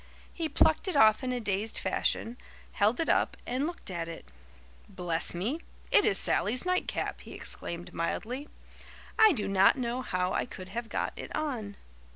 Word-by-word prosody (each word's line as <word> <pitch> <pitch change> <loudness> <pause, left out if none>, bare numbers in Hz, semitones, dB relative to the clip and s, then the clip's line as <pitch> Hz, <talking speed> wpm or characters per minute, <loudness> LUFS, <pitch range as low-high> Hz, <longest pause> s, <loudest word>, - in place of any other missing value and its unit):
He 325 -2 -2
plucked 315 +4 +3
it 370 - -1
off 220 -1 +6
in 255 - -1
a 250 - -1
dazed 210 0 -1
fashion, 230 - 0 0.4
held 215 +4 +2
it 330 - 0
up, - - +2
and 260 +5 -1
looked 345 - -7
at 170 -2 -3
it. 165 - -8 0.6
'Bless 175 -3 -2
me, 225 - -1 0.3
it - - +6
is 195 - +4
Sally's 245 - +2
nightcap!' 365 0 -1
he - - -11
exclaimed 170 0 -3
mildly. 245 - -3 0.7
'I 435 -3 +8
do 215 -8 -1
not 195 +5 +5
know 245 0 -2
how 185 -6 -1
I - - 0
could 185 -5 -9
have 230 +1 -5
got - - -2
it - - -6
on. 245 -10 -3
225 Hz, 175 wpm, -30 LUFS, 190-275 Hz, 0.7 s, I